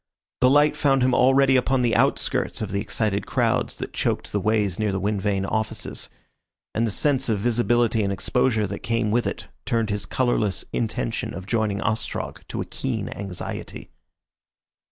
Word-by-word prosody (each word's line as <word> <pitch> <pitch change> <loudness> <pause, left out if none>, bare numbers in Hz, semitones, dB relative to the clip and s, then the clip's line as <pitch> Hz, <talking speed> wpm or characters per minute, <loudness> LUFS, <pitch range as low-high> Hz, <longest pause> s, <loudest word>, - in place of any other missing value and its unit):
The 125 - +5
light 145 +2 +4
found 135 -3 +2
him 130 0 +3
already 135 +2 +5
upon 130 0 +2
the 120 -3 +2
outskirts - - +1
of 100 - -4
the 100 +1 -1
excited 105 -2 -1
crowds - - +1
that - - -6
choked - - -1
the 105 - 0
ways 105 -3 +1
near 105 -1 +1
the 95 - -1
wind 100 +1 -1
vane 100 -1 0
offices, 110 +2 -3 0.6
and 115 +1 +1
the - - 0
sense 135 +4 +1
of 110 - +2
visibility 120 +1 +2
and 100 -1 0
exposure 110 +2 +1
that 100 +1 -5
came 115 -2 0
with 120 +2 +2
it - - -4 0.2
turned 115 -2 0
his 105 0 -2
colourless 120 -6 0
intention 115 0 -2
of 95 - -7
joining 105 -2 0
Ostrog 110 0 -2
to - - -4
a - - -3
keen - - -3
anxiety. 95 -3 -6
110 Hz, 175 wpm, -24 LUFS, 100-125 Hz, 0.6 s, The